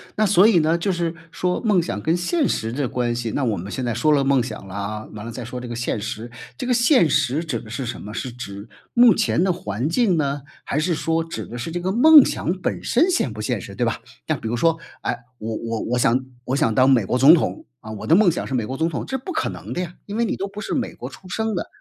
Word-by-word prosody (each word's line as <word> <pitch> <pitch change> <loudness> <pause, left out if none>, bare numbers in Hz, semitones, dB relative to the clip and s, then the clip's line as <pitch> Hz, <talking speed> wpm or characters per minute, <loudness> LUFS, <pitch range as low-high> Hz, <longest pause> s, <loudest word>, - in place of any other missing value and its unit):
那 215 - +2
所 195 0 +6
以 205 -6 +5
呢 160 +2 +2
就 180 +4 0
是 170 -2 -1 0.2
说， 180 0 -1
梦 210 -6 +3
想 105 -11 -4
跟 160 +9 +1
现 275 - +1
实 110 0 -1
的 135 +2 -1
关 120 -1 -1
系 120 -2 -3
那 140 - -1
我 115 -5 0
们 95 +4 -6
现 130 - -3
在 120 -1 -1
说 125 +7 +2
了 145 -2 +3
梦 135 -1 +3
想 120 -5 -7
了 95 - -9
啊， 105 +2 -4
完 105 0 -8
了 115 - -6
再 120 +2 -6
说 125 +2 -6
这 125 - -7
个 120 - -5
现 120 -2 -2
实， 110 +2 -5 0.3
这 255 - -4
个 250 - +2
现 240 - +4
实 145 +1 +1
指 140 -9 -3
的 110 - -12
是 125 +4 -4
什 120 - -5
么？ 105 - -8
是 125 +2 -4
指 105 -3 -8 0.3
目 240 -1 +7
前 205 -5 +1
的 190 - +2
环 150 - -3
境 190 -1 +2
呢， 140 -1 -1 0.2
还 145 - -1
是 170 +3 +1
说 165 +2 0
指 165 - -6
的 120 - -8
是 125 +7 -5
这 175 - -2
个 185 +2 -1
梦 295 +7 +8
想 170 - -1
本 - - -2
身 320 +10 +3
现 345 - +1
不 110 - -6
现 105 - -1
实， - - -9
对 - - 0
吧？ - - -1 0.3
那 - - +1
比 - - -6
如 115 - -1
说， 165 +6 +2 0.2
哎， - - -2 0.2
我 110 +1 -4
我 115 0 -3
我 125 - -1
想 125 +2 +2 0.2
我 130 - -1
想 115 -5 +2
当 130 +1 +5
美 120 -6 +4
国 125 - 0
总 135 +5 +8
统， 170 - 0
啊， 110 - -9
我 110 - -7
的 160 - +6
梦 195 -2 +5
想 165 - -3
是 - - -5
美 120 -4 0
国 130 +4 -5
总 160 - +1
统， 160 - -4
这 265 - -2
不 265 +8 -6
可 320 0 -1
能 - - -7
的 180 - -2
呀， 175 -1 -5
因 205 - -6
为 235 +1 +1
你 - - -1
都 195 - -3
不 200 +1 -8
是 - - -4
美 - - -2
国 - - -7
出 190 - -14
生 220 +3 -1
的。 175 - -3
145 Hz, 310 characters per minute, -22 LUFS, 120-180 Hz, 0.3 s, 梦